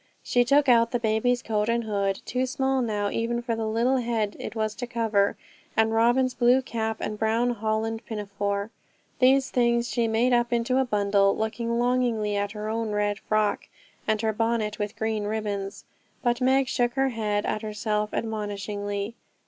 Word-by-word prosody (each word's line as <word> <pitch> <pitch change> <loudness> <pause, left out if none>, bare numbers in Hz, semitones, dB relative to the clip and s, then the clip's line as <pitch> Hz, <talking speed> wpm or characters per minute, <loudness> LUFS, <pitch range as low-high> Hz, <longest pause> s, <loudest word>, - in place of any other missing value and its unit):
She 245 0 +3
took 280 +3 +3
out 230 -2 +5
the 245 - -1
baby's 235 +2 +1
coat 210 0 0
and 235 0 +1
hood, 200 -3 -1
too 255 +1 -1
small 265 0 0
now 205 -3 -1
even 235 +1 -1
for 235 -1 -1
the 225 -1 -2
little 235 +4 +2
head 230 -4 -1
it - - -6
was 215 -1 -1
to 245 - -4
cover, 220 -4 +1 0.4
and 220 0 +3
Robin's 240 +3 +3
blue 245 +2 +4
cap 220 -3 -2
and 210 0 -4
brown 225 +2 +2
holland 220 0 -2
pinafore. 200 -1 -3 0.5
These 265 +1 +4
things 235 -1 +2
she 235 -2 +1
made 230 +3 +2
up 240 0 +2
into 240 +2 +1
a 265 - +2
bundle, 200 -3 +2
looking 230 +2 -2
longingly 240 -4 +1
at 200 0 -1
her 210 0 -5
own 225 0 -2
red 205 0 0
frock, 215 -1 0 0.4
and 215 -1 +2
her 220 -1 +1
bonnet 225 -1 -1
with 205 0 -3
green 220 -1 -1
ribbons: 205 -2 -3 0.4
but 240 0 +1
Meg 265 +1 +3
shook 245 -2 0
her 270 0 +1
head 210 -3 -1
at 215 - -1
herself 210 0 -2
admonishingly. 205 -1 -3
225 Hz, 175 wpm, -26 LUFS, 210-240 Hz, 0.5 s, out